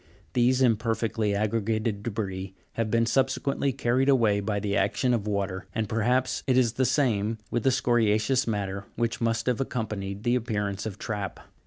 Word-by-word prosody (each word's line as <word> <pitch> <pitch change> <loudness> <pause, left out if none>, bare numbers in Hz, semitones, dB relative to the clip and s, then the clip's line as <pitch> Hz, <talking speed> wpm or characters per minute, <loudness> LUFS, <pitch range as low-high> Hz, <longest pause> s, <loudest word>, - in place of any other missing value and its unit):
These 125 +2 +3
im 115 -4 +4
perfectly 115 -2 -1
aggregated 110 0 0
debris 95 -4 -4 0.2
have 115 -1 -2
been 115 +1 +2
subsequently 135 +2 +1
carried 130 +1 +1
away 115 -7 +4
by 100 0 -1
the 100 -1 -1
action 125 +4 +1
of 110 -3 -1
water, 100 -2 -2
and 110 -1 0
perhaps 125 +4 +1
it 130 -1 +3
is 120 -3 +3
the 130 +1 +1
same 115 -5 +1
with 120 - 0
the 135 - +3
scoria'ceous 120 0 +2
matter 100 -2 -2
which 115 0 -1
must 115 -1 0
have 125 0 +1
accompanied 105 -5 -3
the 120 - +2
appearance 105 -5 -1
of 100 -2 -6
trap. 105 -4 -4
115 Hz, 170 wpm, -27 LUFS, 105-125 Hz, 0.2 s, im